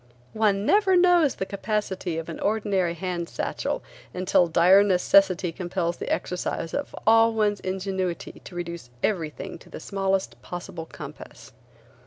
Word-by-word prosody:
One 210 -2 +2
never 400 - +4
knows 350 -5 +4
the 190 - -3
capacity 195 -4 -2
of 165 - -4
an 165 - -6
ordinary 200 -5 0
hand 175 0 -3
satchel - - -3 0.3
until 180 -1 +3
dire 175 +4 +6
necessity 185 -2 +3
compels 175 -1 -2
the - - -5
exercise 180 -2 -2
of 285 - -3
all 225 0 +5
one's 210 -2 +1
ingenuity 190 -1 -3
to 180 - -10
reduce 170 -6 -6
every 170 -7 0
thing - - -8
to - - -17
the - - -8
smallest 195 +2 -2
possible 175 -2 -7
compass. - - -11
190 Hz, 145 wpm, -25 LUFS, 175-205 Hz, 0.3 s, dire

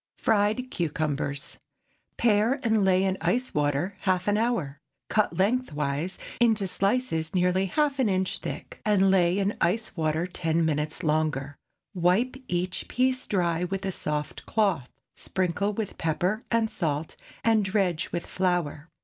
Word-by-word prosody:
FRIED 220 +4 +1
CUCUMBERS. 150 -4 -2 0.5
✠ - - -47
Pare 230 +4 +3
and 220 -3 +3
lay 190 0 +4
in 190 0 0
ice 215 +10 0
water 150 +6 0
half 185 0 0
an 205 - +3
hour. 195 - 0 0.3
Cut 215 -1 +1
lengthwise, 180 - 0 0.2
into 225 -4 +3
slices 195 -4 0
nearly 180 +1 +2
half 290 +4 +1
an 250 -5 +3
inch 185 -1 0
thick, - - -7
and 195 -2 +4
lay 180 -1 +3
in 200 +1 0
ice 205 +7 0
water 160 0 0
ten 165 -2 0
minutes 155 +2 -1
longer. 150 -3 0 0.4
Wipe 185 +8 +2
each 180 +1 -2
piece 255 +1 +1
dry 175 -3 +1
with 195 +2 -3
a 190 - 0
soft 150 -4 -3
cloth, 195 - +1 0.3
sprinkle 190 +2 -1
with 210 -1 -4
pepper 180 +7 0
and 230 -1 +1
salt, 155 -2 -2 0.3
and 225 -2 +4
dredge 190 -4 0
with 170 -1 -3
flour. 175 -4 -1
185 Hz, 145 wpm, -27 LUFS, 160-210 Hz, 0.5 s, lay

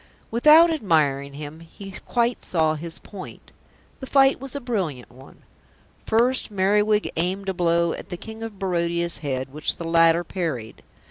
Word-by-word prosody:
Without 305 +8 +6
admiring 145 - 0
him, 150 +2 -8
he 195 +4 -11 0.2
quite 240 0 0
saw 160 -3 +1
his 165 +2 -3
point. 195 -3 -11 0.5
The 265 - -8
fight 270 0 +4
was 270 +1 -7
a - - -2
brilliant 185 - -4
one. 130 +2 -17 0.6
First 240 +4 +2
Merriwig 210 +2 +1
aimed 190 +4 -1
a - - -1
blow 170 -1 +1
at - - -9
the 180 - -5
King 220 +4 -10
of 225 -3 -7
Barodia's 170 -3 0
head 135 -2 -4
which 150 +1 0
the - - -7
latter 165 +1 +4
parried. 160 - -5
175 Hz, 155 wpm, -23 LUFS, 160-220 Hz, 0.6 s, Without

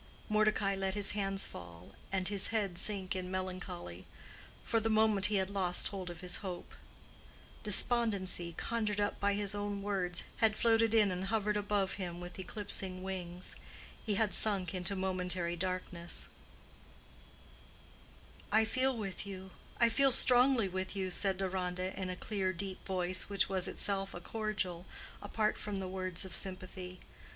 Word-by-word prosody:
Mordecai 215 -2 +3
let 195 0 -1
his 205 -1 +4
hands 195 -1 -1
fall, 85 0 -10 0.2
and 190 -1 0
his 200 -1 +1
head 200 -6 -1
sink 195 -3 -1
in 185 -1 -3
melancholy: 180 - -5 0.6
for 230 - +2
the 225 +1 0
moment 215 -2 +4
he 210 - 0
had 190 0 +1
lost 185 -3 +3
hold 190 -3 -5
of 175 -2 -8
his 180 -1 +1
hope. 180 -3 -6 0.9
Despondency, 200 -6 +4
conjured 215 -3 -1
up 205 0 0
by 200 0 +2
his 205 -1 -1
own 205 -1 -3
words, 185 -3 0
had 220 -1 +3
floated 225 -1 +4
in 210 -3 +5
and 180 +1 -2
hovered 210 0 +1
above 205 -2 +1
him 175 -1 -4
with 175 +1 -8
eclipsing 190 -1 -3
wings. 180 -1 -5 0.5
He 210 -3 0
had 210 0 +1
sunk 200 -4 +2
into 185 +1 -1
momentary 180 -2 -1
darkness, 180 -1 -2 2.2
"I 220 +1 +5
feel 255 +2 +2
with 200 -1 -4
you—I 190 +4 -2
feel 275 +3 +4
strongly 250 -2 +5
with 185 +1 -3
you," 190 -1 -2
said 190 +1 +1
Deronda, 185 -1 -2
in 190 -1 -3
a 185 - -3
clear 190 -1 -1
deep 190 +1 -3
voice 185 0 -2
which 200 -2 +2
was 190 -2 0
itself 195 -1 -1
a - - -4
cordial, 190 -3 -3 0.3
apart 215 +1 0
from 210 -1 -3
the 190 -1 -3
words 185 -1 -3
of 190 - -7
sympathy. 185 -1 -5
195 Hz, 155 wpm, -34 LUFS, 185-210 Hz, 2.2 s, in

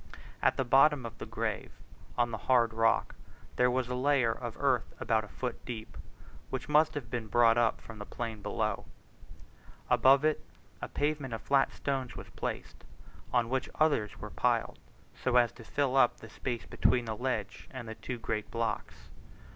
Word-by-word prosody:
At - - +3
the 130 - +1
bottom 135 +1 +5
of 115 -1 -8
the - - -6
grave - - -3 0.4
on 120 -1 +2
the 110 - -4
hard 120 -3 +4
rock 115 0 +2 0.4
there 125 0 +4
was 125 0 0
a 125 - -3
layer 130 -2 +3
of 115 0 -5
earth 135 -4 +1
about 110 -1 +1
a - - -9
foot 125 +3 -5
deep, 115 -3 -7 0.5
which - - -4
must 150 +1 +4
have 125 -6 -5
been 115 -2 -3
brought 115 +1 +5
up 120 -1 +2
from 110 -2 -11
the 105 - -6
plain 115 -3 -5
below. 105 0 -2 1.1
Above 135 +2 +6
it 155 -1 +1 0.4
a - - -3
pavement 145 -5 -1
of 110 - -7
flat 135 -1 +3
stones 135 -3 -3
was - - -9
placed, - - -5 0.5
on 120 -2 +2
which 130 +2 -1
others 145 -10 +1
were - - -7
piled, - - 0 0.3
so 130 - -1
as 120 -2 +5
to 115 - -13
fill 135 +2 0
up 130 -3 +5
the 115 - -12
space 115 -3 -4
between 120 +6 +2
the 110 -1 -3
ledge 115 -4 -3
and 130 -3 -7
the 110 - -5
two 125 +2 -6
great 110 -2 -3
blocks. 115 -1 -3
120 Hz, 180 wpm, -31 LUFS, 115-130 Hz, 1.1 s, Above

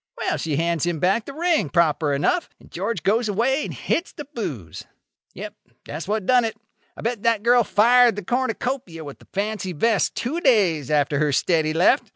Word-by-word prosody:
Well, - - -1
she 155 -3 -2
hands 165 +1 0
him 175 -1 0
back 195 +8 +1
the 280 - -8
ring, 330 - +1
proper 160 -3 +2
enough; 145 - 0
and - - -19
George 195 +1 -3
goes 220 +3 +1
away 245 +8 +1
and - - -6
hits 340 - -2
the 295 - -8
booze. 115 - -6 0.5
Yep. - - -7 0.3
That's 155 +4 -6
what 210 -1 -1
done 250 +1 +4
it. 225 -1 -3 0.4
I - - -8
bet 230 -2 -2
that 230 -2 +1
girl 240 +1 +5
fired 240 +2 +4
the 205 -3 -6
cornucopia 245 -7 -2
with 145 -2 -10
the - - -20
fancy 200 -2 -3
vest 220 +6 +1
two 295 +8 -2
days 185 - +2
after 145 -1 +1
her 150 -1 +1
steady 155 +2 +1
left. 180 - +3
205 Hz, 195 wpm, -22 LUFS, 160-245 Hz, 0.5 s, girl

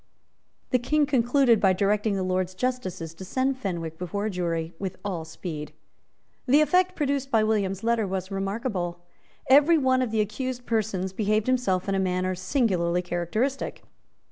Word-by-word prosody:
The 250 - +3
King 300 +5 +2
concluded 250 -3 +3
by 195 -2 +4
directing 205 +2 +1
the 190 - -1
Lords 185 0 -1
justices 185 -9 -3
to 165 - -10
send 260 +6 -1
Fenwick 170 -6 -4
before 190 +4 -3
a 215 - -1
jury 170 -2 -2
with 190 -2 -4
all 175 -5 -3
speed. 160 -2 -7 0.7
The 280 +4 +6
effect 365 +3 +3
produced 280 -2 -1
by 225 -4 +3
William's 200 -3 0
letter 230 -2 +1
was 190 0 -4
remarkable. 195 -3 -3 0.4
Every 290 +5 +6
one 260 -3 +2
of 255 - 0
the 220 -1 +1
accused 245 +4 -4
persons 200 -5 -1
behaved 215 +1 +1
himself 240 -8 +1
in 195 - 0
a 195 - +1
manner 185 0 0
singularly 180 -4 0
characteristic. 180 +11 -2
205 Hz, 160 wpm, -26 LUFS, 185-255 Hz, 0.7 s, The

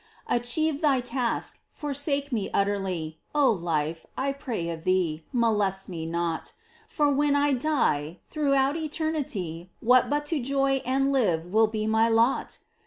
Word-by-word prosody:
Achieve 280 +6 +1
thy 285 -4 +3
task 245 -1 -2
— - - -42
forsake 285 0 -2
me 215 -5 -1
utterly! 190 -6 -1 0.2
O 285 -4 +5
Life, 165 -4 -2
I 275 +1 0
pray 235 -11 -4
of 160 -1 -7
thee, 170 -4 0
molest 210 -6 +1
me 165 -3 -5
not! 170 -1 -2 0.3
For 295 -2 +1
when 285 +1 +2
I 285 0 +3
die, 240 - 0
throughout 275 -2 +1
eternity 290 - -3
What 250 +2 +4
but 295 +1 0
to 295 - 0
joy 270 +1 +1
and 270 +1 +2
live 180 -12 +1
will 215 +5 +3
be 215 0 -3
my 220 +1 +3
lot 230 +3 +2
240 Hz, 150 wpm, -26 LUFS, 180-280 Hz, 0.3 s, O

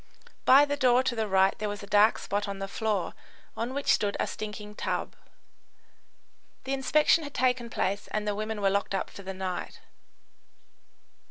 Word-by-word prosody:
By 275 +3 +8
the 285 0 -1
door 255 -2 +4
to 255 -2 -1
the 220 -1 -1
right 190 -1 +3
there 210 0 -2
was 205 0 -6
a - - -6
dark 210 +2 +4
spot 205 +1 -2
on 200 -1 -4
the 195 0 -4
floor 210 -2 -2 0.4
on 240 +4 -3
which 280 - -3
stood 205 -1 0
a - - +1
stinking 210 0 -7
tub. - - -3 1.5
The 265 - -3
inspection 300 +4 +3
had 285 -1 -8
taken 250 -2 +1
place 200 -2 -2
and 210 0 -3
the 210 - +1
women 215 +1 -4
were 195 -1 +3
locked 200 0 0
up - - -3
for - - -10
the 190 0 -6
night. 185 -2 -5
210 Hz, 180 wpm, -28 LUFS, 200-255 Hz, 1.5 s, By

